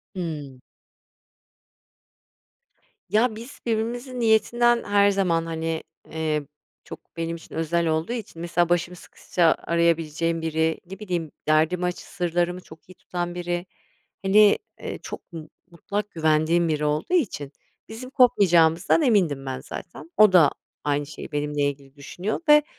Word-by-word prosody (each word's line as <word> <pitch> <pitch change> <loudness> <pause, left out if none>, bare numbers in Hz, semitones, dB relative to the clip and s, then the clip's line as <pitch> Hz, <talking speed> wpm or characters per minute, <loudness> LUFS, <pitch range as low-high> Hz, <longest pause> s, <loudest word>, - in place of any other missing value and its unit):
Hıı. 150 -7 -5 2.5
Ya, 220 +2 +2
biz 235 +6 -10
birbirimizin 240 +3 -2
niyetinden, 235 +2 +3
her 205 0 +4
zaman, 170 -4 +1
hani, 165 0 -3 0.3
eee, 155 -2 -2 0.4
çok, - - -9 0.2
benim 165 0 -2
için 165 - -12
özel 165 +1 0
olduğu 160 +8 0
için 205 -8 -7
mesela 175 0 +1
başım 175 +1 0
sıkışsa 170 -1 0
arayabileceğim 165 -1 +1
biri, 160 0 0
ne 195 +3 -10
bileyim, 175 -7 -3 0.2
derdimi 160 +4 +2
aç 180 - -2
sırlarımı 175 0 -2
çok 160 +2 -16
iyi - - -11
tutan 175 -1 -5
biri, 175 0 -3 0.6
hani, 205 +1 +6 0.3
iii, - - -5
çok 175 - -9
mu 155 -2 -8 0.2
mutlak 205 +4 -4
güvendiğim 160 +1 +2
biri 150 -1 0
olduğu 150 - -1
için, 150 - 0 0.4
bizim 245 +3 -8
kopmayacağımızdan 180 - +4
emindim 175 - +2
ben 130 -1 -4
zaten. 325 - -9
O 210 -3 +7
da 160 -6 +7 0.3
aynı 145 0 0
şeyi 150 +1 -9
benimle 150 0 -2
ilgili 140 0 -11
düşünüyor 175 +9 -4
ve 300 0 +8
170 Hz, 135 wpm, -24 LUFS, 160-205 Hz, 2.5 s, ve